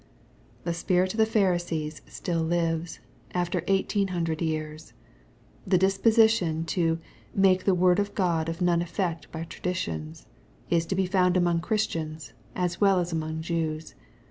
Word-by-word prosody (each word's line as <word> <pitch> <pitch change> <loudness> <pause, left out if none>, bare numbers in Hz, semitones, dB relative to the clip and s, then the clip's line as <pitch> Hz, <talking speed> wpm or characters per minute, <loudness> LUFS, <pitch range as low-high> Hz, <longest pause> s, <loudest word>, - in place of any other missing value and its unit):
The 170 - -1
spirit 180 +2 +1
of 220 - -5
the 220 - +5
Pharisees 175 -7 0
still 170 -2 -2
lives, 165 0 -1 0.3
after 175 -1 0
eighteen 195 +1 +1
hundred 165 -3 -2
years. 155 -1 -3 0.7
The 185 -1 +4
disposition 195 -3 +3
to 165 -3 +1 0.2
" - - -27
make 185 -1 +3
the 195 - +4
word 180 +1 +4
of 205 0 -2
God 165 -4 +1
of 165 +2 -5
none 175 -1 +3
effect 170 -1 -3
by 160 0 -5
traditions," 85 - -4 0.5
is 165 -1 +2
to 190 - -1
be 190 0 +1
found 180 -1 +2
among 175 -2 +2
Christians, 165 -6 -2 0.2
as 180 0 -2
well 195 -2 +5
as 175 0 -2
among 160 0 -3
Jews. 160 -2 -2
175 Hz, 150 wpm, -27 LUFS, 165-185 Hz, 0.7 s, the